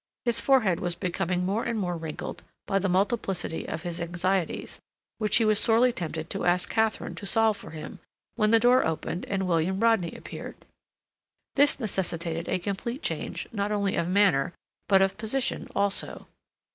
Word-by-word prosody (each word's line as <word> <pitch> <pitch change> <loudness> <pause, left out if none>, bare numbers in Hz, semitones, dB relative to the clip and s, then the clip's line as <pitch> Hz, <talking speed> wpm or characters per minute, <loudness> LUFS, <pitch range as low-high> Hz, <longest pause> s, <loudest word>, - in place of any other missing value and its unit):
His 235 -1 +3
forehead 230 -11 +3
was 175 -1 -1
becoming 180 0 -1
more 205 +5 0
and 235 -1 -2
more 180 -4 -1
wrinkled 160 -2 -6 0.2
by 195 - +1
the 195 0 0
multiplicity 195 -3 -1
of 160 - -4
his 175 -1 -4
anxieties, 175 +1 -1 0.4
which 215 -1 +2
he 230 - +3
was 215 -1 +5
sorely 235 +2 +5
tempted 165 -5 -4
to - - -2
ask 180 +1 +2
Katharine 220 -1 0
to 200 - -6
solve 220 +1 +3
for 200 - -11
him, 155 -1 -8 0.3
when 215 -2 +2
the 225 +1 +6
door 245 +2 +5
opened 160 +2 -2
and 195 -1 -1
William 175 +2 +1
Rodney 225 -7 +2
appeared. - - -8 1.0
This 285 0 +4
necessitated 170 -6 -3
a - - +1
complete 200 - -4
change, - - -3
not 205 -2 -2
only 200 -2 0
of 170 - 0
manner, 180 -6 +3 0.4
but 195 -1 +6
of 195 +2 -1
position 235 +4 -1
also. 200 0 0
195 Hz, 170 wpm, -27 LUFS, 175-220 Hz, 1.0 s, the